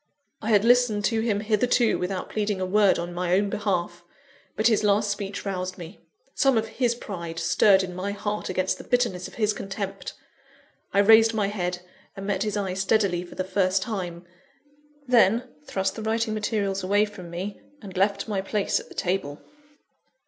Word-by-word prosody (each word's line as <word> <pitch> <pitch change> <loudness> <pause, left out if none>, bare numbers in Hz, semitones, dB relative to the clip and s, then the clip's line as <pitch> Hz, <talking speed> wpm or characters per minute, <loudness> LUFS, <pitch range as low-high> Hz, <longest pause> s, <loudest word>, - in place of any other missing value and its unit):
_" - - -50 0.4
I 220 - -3
had 210 -1 +4
listened 240 -4 +4
to 225 +2 +1
him 210 -3 0
hitherto 225 +2 +2
without 185 +1 -3
pleading 210 -2 -1
a 185 - -1
word 200 +1 +4
in 175 +1 -4
my 180 0 0
own 200 +1 +1
behalf; 175 -4 -2 0.5
but 215 - -1
his 220 -2 +4
last 205 0 +2
speech 200 0 -5
roused 185 -1 -3
me. 175 +2 -10 0.3
Some 270 -4 +3
of 220 0 -1
his 240 -2 +2
pride 170 -8 -7
stirred 190 +3 +4
in 180 -1 -5
my 185 +3 -3
heart 205 +1 -3
against 185 0 -1
the - - -8
bitterness 235 -8 0
of - - -14
his 215 -2 +1
contempt. 195 0 -5 0.8
I - - -2
raised 225 +2 +6
my 205 -2 +1
head, 180 -3 -3 0.3
and 195 - -6
met 195 -1 -1
his 210 -1 -1
eye 195 -2 -2
steadily 190 -2 +1
for 175 - -12
the 185 - -2
first 190 0 +1
time 180 -6 -5 0.8
then, 240 0 +4 0.2
thrust 190 0 -1
the 225 - -6
writing 220 0 0
materials 205 -3 -1
away 205 +3 +3
from 190 -5 -10
me, 185 +4 -6 0.2
and 200 -6 -10
left 200 +2 +1
my 200 -3 -1
place 200 +1 0
at - - -12
the - - -13
table. 175 -6 -2
200 Hz, 185 wpm, -25 LUFS, 185-215 Hz, 0.8 s, raised